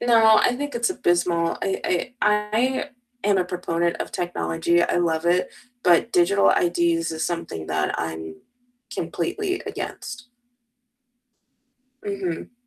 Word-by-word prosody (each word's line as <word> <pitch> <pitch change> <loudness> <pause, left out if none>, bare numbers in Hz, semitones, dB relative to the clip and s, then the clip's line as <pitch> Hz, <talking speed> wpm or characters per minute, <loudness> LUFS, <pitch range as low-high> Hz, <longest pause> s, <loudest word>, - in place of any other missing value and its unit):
No, 225 -2 +6
I 245 - +2
think 290 +1 -4
it's 235 +8 +1
abysmal, 175 - +1
I 195 -1 -1
I 180 +8 -1
I 210 +5 +1 0.4
am 200 -2 +4
a 180 - +2
proponent 170 -1 -1
of - - -4
technology, 170 -1 0
I - - +1
love 165 -2 +1
it, 180 +1 +2 0.3
but 180 +6 +4
digital 195 +3 +4
IDs 170 -1 +1
is 160 - -2
something 165 - -4
that 75 0 0
I'm 80 -1 -5 0.6
completely 370 0 -2
against. 255 0 -6 1.7
Mhm. 195 0 -4
175 Hz, 125 wpm, -23 LUFS, 170-220 Hz, 1.7 s, No